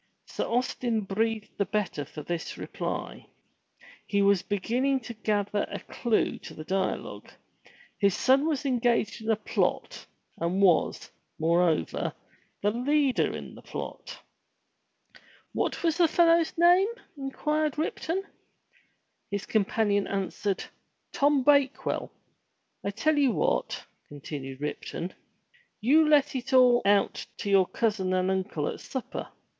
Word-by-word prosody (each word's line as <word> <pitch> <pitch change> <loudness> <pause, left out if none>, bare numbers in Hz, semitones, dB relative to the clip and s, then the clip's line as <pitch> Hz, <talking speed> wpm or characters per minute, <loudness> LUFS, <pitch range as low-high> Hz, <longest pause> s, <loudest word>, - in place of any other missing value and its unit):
Sir - - -3
Austin 240 -1 0
breathed 215 +2 -2
the 200 - +2
better 190 -7 -2
for 150 +1 -9
this 170 0 -4
reply. - - -5 0.8
He 200 -1 +2
was 200 -2 +4
begin 210 +5 -1
ning 270 0 +2
to 235 +1 -7
gather 210 -2 -1
a - - -4
clue 235 -3 -1
to - - -10
the 155 - -7
dialogue. 190 +3 -3 0.7
His 200 -3 +3
son 270 +3 +4
was 295 -4 -1
engaged 240 -4 +1
in 220 - -5
a 220 - +4
plot, 210 - -2 0.3
and 170 +3 0
was, 180 -5 +2 0.3
moreover, 165 - +1 0.5
the 205 - +3
leader 270 +3 +2
in - - -9
the - - -12
plot. - - -7 1.3
"What - - -1
was 330 -2 +2
the 345 -2 +5
fellow's 335 0 +3
name?" 355 +3 +6 0.3
inquired 300 +2 -1
Ripton. 330 +4 -2 1.1
His 200 -1 -3
companion 205 -1 +1
answered, 195 0 -2 0.5
*'Tom 285 -1 +3
Bakewell." 280 -1 +2 0.7
"I - - -1
tell 290 +9 +1
you 275 -4 +3
what," - - -1 0.2
continued 140 -2 -7
Ripton, 165 +4 -4 0.7
"you 300 +7 +4
let 290 -2 +4
it 260 +1 -4
all 250 -2 +6
out 200 0 +2
to 200 - -3
your 190 -2 +5
cousin 210 -5 0
and 185 +1 +1
uncle 190 -5 -1
at - - -4
supper. 260 -3 -5
220 Hz, 130 wpm, -28 LUFS, 195-275 Hz, 1.3 s, name